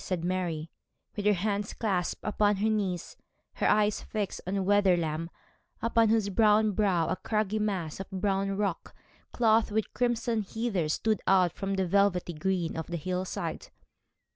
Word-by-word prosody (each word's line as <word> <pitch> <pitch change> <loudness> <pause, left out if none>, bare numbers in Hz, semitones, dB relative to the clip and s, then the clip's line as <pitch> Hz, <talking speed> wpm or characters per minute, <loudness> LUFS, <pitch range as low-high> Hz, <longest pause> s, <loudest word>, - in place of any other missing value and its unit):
said 175 -3 -2
Mary, 175 -4 -2 0.5
with 205 0 -1
her 210 - +5
hands 205 +2 -2
clasped 190 -6 -2
upon 210 0 +2
her 210 +3 0
knees, 195 -5 -2 0.4
her - - +1
eyes 210 0 +2
fixed 210 -3 -4
on 190 0 -1
Wetherlam, 175 -5 +2 0.5
upon 230 -1 +3
whose 220 0 +3
steep 200 -1 -5
brow 210 -5 +3
a - - 0
craggy 215 -1 -1
mass 190 -7 -2
of 195 - -6
brown 195 0 -1
rock 200 -4 -3 0.4
clothed 225 -1 +3
with 215 0 -2
crimson 235 -2 0
heather 200 -5 -2
stood 215 +7 0
out 185 -3 +4
from 195 0 -3
the 190 -1 0
velvety 180 -1 +2
green 175 +1 -1
of 160 -1 -4
the 175 - -3
hill 185 +3 -2
side. - - -5
195 Hz, 160 wpm, -29 LUFS, 180-215 Hz, 0.5 s, her